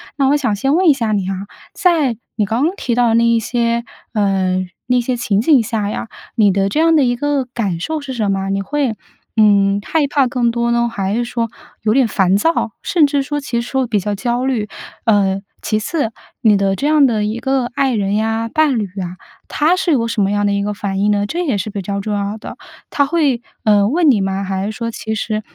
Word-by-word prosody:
那 275 -2 +2
我 290 - +4
想 245 -8 0
先 270 +8 +1
问 365 +1 +3
一 - - +7
下 230 -5 -2
你 195 -3 0
啊， 195 - -1 0.4
在 310 - +2 0.2
你 215 -2 +1
刚 225 +7 0
刚 350 +4 0
提 245 -11 -2
到 245 -1 +3
的 - - +2
那 230 - +4
一 230 0 +3
些， 235 +1 0 0.3
呃， 190 -3 +1 0.2
那 250 0 +3
些 250 +1 -1
情 215 -4 0
景 275 +1 +5
下 215 -2 -2
呀， 235 - -4 0.3
你 210 -3 +4
的 195 +1 +1
这 295 - -1
样 330 0 +4
的 295 - +4
一 245 -1 +1
个 285 +1 0
感 195 -8 -2
受 315 - -3
是 280 -2 -6
什 215 -5 0
么？ 195 0 -2
你 195 0 0
会， 275 -1 -1 0.4
嗯， 200 -2 +4
害 310 -3 +1
怕 280 -1 +2
更 245 -1 +1
多 235 0 0
呢？ 235 0 +2
还 195 -3 -2
是 240 - 0
说 235 -1 -2 0.3
有 215 0 +2
点 260 -1 +3
烦 190 -3 +2
躁， 275 0 +1
甚 330 -4 +3
至 285 -1 +1
说 290 +2 -3
其 235 -4 -2
实 235 - -7
说 265 -1 0
比 215 -3 +1
较 205 +2 -2
焦 240 +4 -1
虑？ 240 -6 -1 0.4
呃， 195 -3 +2 0.2
其 215 - 0
次， 230 +1 -2 0.3
你 220 -4 +5
的 195 -1 +1
这 275 - -3
样 305 -2 +5
的 220 -4 0
一 215 +2 -2
个 265 0 0
爱 270 -2 +1
人 200 -2 0
呀、 225 +1 0
伴 305 -5 +3
侣 210 - -1 0.2
啊， 180 0 -6 0.3
他 315 +4 +2
是 370 -2 0
有 235 -6 +2
什 230 -2 -1
么 195 - +2
样 205 0 +1
的 200 - +1
一 200 - 0
个 210 +1 -2
反 195 -1 -3
应 205 +1 +2
呢？ 205 0 +1
这 345 +9 -2
也 265 -9 0
是 200 - -3
比 200 - -4
较 200 +2 -3
重 210 +1 -3
要 200 +1 -2
的。 - - -9 0.3
他 285 - +2
会， 285 -6 +1 0.2
呃， 205 -2 +4
问 315 +6 +3
你 215 -6 +2
吗？ 195 0 -1
还 190 0 -2
是 210 - -2
说 230 +1 -4
其 220 -1 -4
实， 215 0 -2
230 Hz, 260 characters per minute, -17 LUFS, 205-270 Hz, 0.4 s, 一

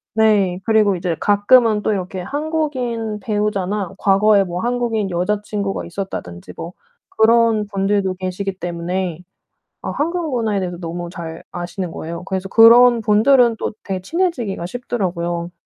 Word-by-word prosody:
네. 205 -5 +3
그리고 215 -3 +3
이제 175 -1 -2
가끔은 210 +1 +4
또 215 - +1
이렇게 185 -1 -4
한국인 255 - -3
배우자나 205 -2 -2
과거에 200 +1 +4
뭐 180 -1 -4
한국인 235 -4 -1
여자 185 +4 0
친구가 200 -2 -3
있었다든지 170 - -7
뭐 170 +2 -7 0.4
그런 225 -1 +4
분들도 195 -1 0
계시기 185 +1 -4
때문에 175 0 -3 0.6
아 - - -4
한국 335 +1 -2
문화에 220 -4 0
대해서 180 -1 -4
너무 175 0 -5
잘 165 -2 -8
아시는 175 0 -5
거예요. 170 +2 -6
그래서 190 0 -4
그런 235 +2 +7
분들은 230 +3 +4
또 - - -3
되게 190 -2 -4
친해지기가 245 - -2
쉽더라고요. 175 -6 -3
200 Hz, 335 characters per minute, -19 LUFS, 180-225 Hz, 0.6 s, 그런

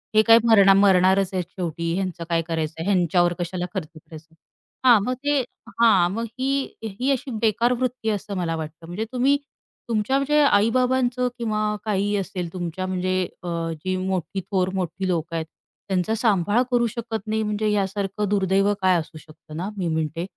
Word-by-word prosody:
हे 215 - +7
काय 225 0 +9
मर 225 -3 +6
मरणारच 190 -1 +4
आहेत 185 -1 0
शेवटी 170 -3 -3
ह्यांचं 185 -2 -3
काय 165 -1 +2
करायचंय 160 -1 -3
ह्यांच्यावर 175 -2 +2
कशाला 175 +1 -3
खर्च 185 -6 -3
करायचा 155 0 -13
आहे, - - -24 0.5
हां 235 -3 +8
मग 250 - -1
ते 290 0 +2 0.4
हां 190 -7 +5
मग 230 +2 -2
ही, 270 +1 0 0.2
ही 225 +6 -2
अशी 265 0 -2
बेकार 235 +2 +2
वृत्ती 250 -2 -2
आहे 215 - +1
असं 200 0 -6
मला 170 -2 -1
वाटतं, 160 +1 -7
म्हणजे 185 +6 -4
तुम्ही 260 +3 +2 0.5
तुमच्या 225 +4 +1
म्हणजे 290 +2 +2
आई-बाबांचं 250 +2 +2
किंवा 215 -2 -1
काहीही 205 -1 0
असेल 185 -3 -4
तुमच्या 180 0 -4
म्हणजे 185 0 0 0.2
अ, - - -6 0.3
जी 185 +4 -3
मोठी 185 0 -2
थोर 185 0 -1
मोठी 190 0 -3
लोकं 170 -2 -2
आहेत 160 -1 -2 0.4
त्यांचा 190 +2 0
सांभाळ 210 -1 +2
करू 240 -1 +3
शकत 225 -2 -5
नाही 220 0 0
म्हणजे 210 0 -1
यासारखं 200 0 -1
दुर्दैव 195 0 +2
काय 185 -1 +4
असू 160 +1 -8
शकतं 155 0 -14
ना 185 +4 -3
मी 180 -3 -1
म्हणते. 160 +1 -2
195 Hz, 175 wpm, -23 LUFS, 175-225 Hz, 0.5 s, काय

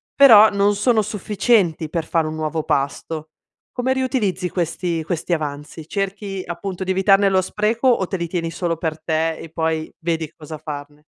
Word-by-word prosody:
però 220 -6 +9
non 200 0 +2
sono 220 +2 +3
sufficienti 200 -5 +1
per 165 0 -2
fare 160 -1 0
un 155 - -4
nuovo 155 0 -2
pasto. 150 +3 -2 0.4
Come 255 +1 0
riutilizzi 215 -9 -1
questi 170 -1 -2
questi 175 +1 -2
avanzi? 150 0 -4
Cerchi 195 0 -3
appunto 185 +2 -5
di 190 - -1
evitarne 195 +1 +4
lo 190 -1 +3
spreco 215 +6 0
o 235 -7 +3
te 190 - -3
li 170 -1 -3
tieni 165 -1 -3
solo 170 -1 -2
per 160 -1 -3
te 160 0 0
e 165 - -9
poi 160 0 -2
vedi 165 -2 -2
cosa 155 0 -9
farne? 145 -1 -8
175 Hz, 170 wpm, -21 LUFS, 160-200 Hz, 0.4 s, però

